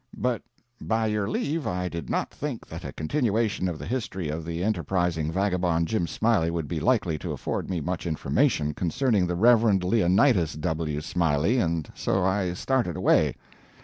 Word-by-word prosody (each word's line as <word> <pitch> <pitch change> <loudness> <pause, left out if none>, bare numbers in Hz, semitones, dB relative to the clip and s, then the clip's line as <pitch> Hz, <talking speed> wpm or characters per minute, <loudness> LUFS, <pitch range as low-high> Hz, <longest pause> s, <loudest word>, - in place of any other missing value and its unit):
But, 125 -2 0 0.4
by 110 0 0
your 105 -1 0
leave, 150 +6 -1
I 90 0 -1
did 85 -3 -6
not - - -1
think - - -5
that - - -8
a - - -5
continuation 110 - 0
of 85 - -4
the - - -7
history 95 -8 -3
of 80 +2 -3
the 85 +2 -3
enterprising 90 -5 0
vagabond 90 -3 +1
Jim 110 -6 0
Smiley 110 -7 +1
would 85 -3 -3
be 85 0 -2
likely 90 -8 +1
to - - -4
afford - - -3
me 90 -4 -1
much 90 +2 -3
information 80 - +1
concerning 95 - +1
the 90 - -1
Rev. 115 +5 +5 0.2
Leonidas 95 - +3
W. 75 -1 -2
Smiley, 85 - +1
and 85 -6 0
so 95 0 0
I 95 -1 +1
started 120 - 0
away. - - +3
90 Hz, 170 wpm, -26 LUFS, 80-110 Hz, 0.4 s, Rev